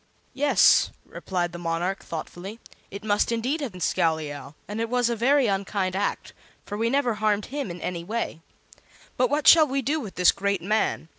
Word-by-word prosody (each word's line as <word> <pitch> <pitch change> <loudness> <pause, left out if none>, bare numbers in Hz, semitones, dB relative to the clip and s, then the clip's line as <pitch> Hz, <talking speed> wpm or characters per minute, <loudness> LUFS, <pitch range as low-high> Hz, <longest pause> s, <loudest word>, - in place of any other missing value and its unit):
"Yes," 285 +1 +4 0.2
replied 175 -2 -3
the 175 - -8
monarch, 175 +3 -2
thoughtfully, 175 +6 -7 0.3
"it 200 +2 -8
must 210 +1 +1
indeed 250 +7 -1
have 275 -5 -3
been 180 - -10
Scowleyow; 155 -5 -1
and 210 +2 -4
it 230 - -2
was 245 -1 +1
a - - 0
very 265 +4 +3
unkind 195 -2 -1
act, 200 +1 -2 0.3
for 205 - -6
we 225 +2 0
never 265 -2 +1
harmed 210 -1 0
him 285 -6 -3
in 175 0 -7
any 170 -2 -4
way. 210 -4 -4 0.7
But 250 -1 +2
what 295 +1 0
shall 320 -2 +8
we 270 0 -1
do 295 +6 0
with 215 -9 -8
this 180 -1 +5
great 200 -3 -2
man? 210 -4 0
210 Hz, 190 wpm, -25 LUFS, 180-245 Hz, 0.7 s, shall